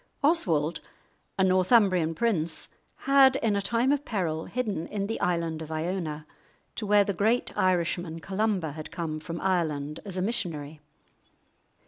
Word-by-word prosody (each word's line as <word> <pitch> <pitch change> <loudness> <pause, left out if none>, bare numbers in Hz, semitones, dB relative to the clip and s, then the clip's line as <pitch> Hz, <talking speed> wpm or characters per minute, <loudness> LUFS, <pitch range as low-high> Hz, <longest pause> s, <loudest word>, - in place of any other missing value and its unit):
Oswald, 170 - +2 0.6
a 190 - +3
Northumbrian 185 -3 +3
prince, 170 -7 0 0.4
had 270 -1 +6
in 225 -6 +1
a 200 - +1
time 235 +6 +1
of 290 0 +1
peril 165 - -2
hidden 210 -9 -3
in 200 -2 -3
the 225 +2 -3
island 165 -2 -1
of 160 0 -7
Iona, 160 -2 -3 0.5
to 215 - -3
where 205 0 +5
the 200 - -2
great 220 +6 0
Irishman 175 -2 0
Columba 190 -2 -1
had 155 +1 -8
come 160 -3 -4
from 165 +2 -6
Ireland 155 -5 -1
as 195 -3 -4
a 185 - 0
missionary. 160 -9 -3
185 Hz, 145 wpm, -27 LUFS, 160-210 Hz, 0.6 s, had